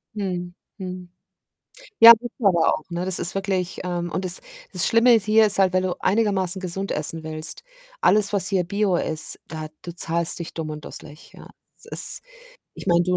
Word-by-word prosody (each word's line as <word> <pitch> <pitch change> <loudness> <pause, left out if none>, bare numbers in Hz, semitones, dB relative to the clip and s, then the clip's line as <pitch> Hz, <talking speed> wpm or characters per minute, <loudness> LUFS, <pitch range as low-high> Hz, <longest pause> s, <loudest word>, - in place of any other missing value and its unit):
Mhm, 180 -3 -3 0.2
mhm. 185 -2 -7 0.9
Ja, 230 0 +12
gibt's 240 +1 -5
aber 180 -7 +3
auch, 155 - -4
ne? 175 +1 -3
Das 185 -1 +1
ist 185 +3 -3
wirklich, 190 -2 -2
ähm 175 -1 -3
und 190 - -2
das 180 0 0 0.3
das 180 -1 +1
Schlimme 235 +2 +5
ist 220 -3 +3
hier 215 +1 +5
ist 205 -1 0
halt, 190 -2 +3
wenn 185 0 +2
du 185 -1 -1
einigermaßen 195 -3 +1
gesund 190 +1 -3
essen 160 +2 -3
willst. 155 - -2 0.4
Alles, 210 -1 +3
was 200 -1 +2
hier 190 -3 +1
Bio 200 +1 0
ist, 155 -2 -3
da 155 -1 -6 0.2
du 175 - -7
zahlst 170 0 0
dich 170 - -6
dumm 160 -2 -4
und 150 -1 -8
dusselig, 150 +1 -10
ja? - - -13 0.3
Es - - -17
ist - - -3 0.5
ich - - -9
meine, 175 -2 +3
185 Hz, 190 wpm, -23 LUFS, 170-200 Hz, 0.9 s, Ja